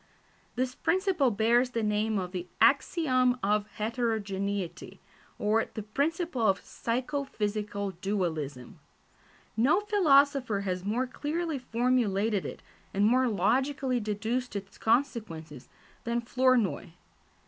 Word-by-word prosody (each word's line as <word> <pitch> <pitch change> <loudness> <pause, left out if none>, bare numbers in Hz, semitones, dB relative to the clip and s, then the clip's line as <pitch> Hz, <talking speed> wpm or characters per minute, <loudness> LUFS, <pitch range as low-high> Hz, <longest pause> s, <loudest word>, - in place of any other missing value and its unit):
This 255 +1 -1
principle 370 -5 +1
bears 235 +3 +3
the 230 -3 -2
name 210 +1 +1
of 180 -2 -3
the 180 -1 -5
axiom 255 -7 +3
of 210 +1 +1
heterogeneity, 205 -4 -3 0.4
or 215 +2 +2
the 215 - -4
principle 285 - -1
of 195 -1 +3
psycho 260 +5 -2
physical 210 -4 -3
dualism. 165 -9 -3 0.8
No 265 - +3
philosopher 280 - +3
has 185 -2 -3
more 225 +6 0
clearly 305 +3 -3
formulated 225 -5 +1
it, - - -9 0.3
and 200 +1 +3
more 255 +3 +4
logically 255 +5 +1
deduced 220 +3 -2
its 200 -1 -7
consequences, 215 - -1 0.3
than 235 0 -1
Flournoy. 245 -8 +1
225 Hz, 110 wpm, -29 LUFS, 200-255 Hz, 0.8 s, more